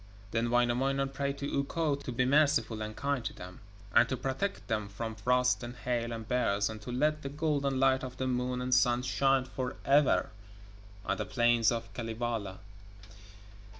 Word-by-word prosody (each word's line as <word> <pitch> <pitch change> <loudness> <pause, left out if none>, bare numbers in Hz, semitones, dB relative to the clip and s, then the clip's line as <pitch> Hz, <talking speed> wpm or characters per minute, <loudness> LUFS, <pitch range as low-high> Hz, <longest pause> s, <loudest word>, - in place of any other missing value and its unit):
Then 115 +1 0
Wainamoinen 125 +3 +1
prayed 140 0 -3
to 140 0 -2
Ukko 150 +2 0
to 140 -2 -5
be 125 +1 +1
merciful 130 -6 +2
and 110 0 -5
kind 140 -3 -1
to - - -4
them, 90 0 -10 0.3
and 120 - +5
to 130 - -1
protect 135 +11 -3
them 110 -3 -2
from 110 +3 -5
frost 125 +4 +2
and 120 0 -7
hail 120 -2 -2
and 115 -1 -6
bears, 105 -4 +1
and 110 -1 -8
to 125 - -7
let 150 +4 +1
the 140 - -5
golden 140 -2 0
light 130 0 +3
of 125 -1 -7
the 130 - -2
Moon 125 0 -1
and 125 0 0
Sun 125 0 +3
shine 135 0 +2
for 130 -1 -4
ever 140 0 +3 0.7
on 100 - 0
the - - -2
plains 120 -2 +3
of 115 -1 -4
Kalevala. 115 -4 -3
125 Hz, 180 wpm, -31 LUFS, 115-135 Hz, 0.7 s, and